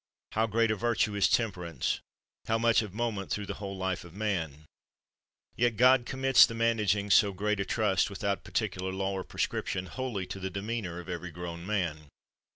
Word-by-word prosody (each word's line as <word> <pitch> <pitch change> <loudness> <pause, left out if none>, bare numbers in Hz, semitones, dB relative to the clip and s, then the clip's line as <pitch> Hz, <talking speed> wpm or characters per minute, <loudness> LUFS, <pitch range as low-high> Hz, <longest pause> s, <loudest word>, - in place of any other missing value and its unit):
How 110 +1 +1
great 115 +1 +2
a - - +1
virtue 110 -1 +1
is 100 -1 +3
temperance, 90 - 0 0.5
how 110 - +2
much 115 0 +4
of 105 -3 -6
moment 110 -2 -2
through 105 - -2
the - - -4
whole 100 -1 -5
life 95 -1 -2
of 85 0 -13
man! 80 -8 -2 0.9
Yet 120 -2 +1
God 125 0 +5
commits 135 -1 +6
the 115 - -6
managing 105 -3 +1
so 100 +1 +5
great 105 +2 -1
a 100 - 0
trust, 100 -4 +1
with 100 0 -8
out 100 -1 0
particular 95 -4 -2
law 95 +1 -1
or 95 -1 -3
prescription, 95 0 -2
wholly 120 -3 -4
to 95 - -7
the 95 0 -3
demeanor 100 -2 -4
of 90 - -10
every 90 0 -5
grown 85 +1 -7
man. 85 -8 -2
100 Hz, 185 wpm, -30 LUFS, 95-115 Hz, 0.9 s, commits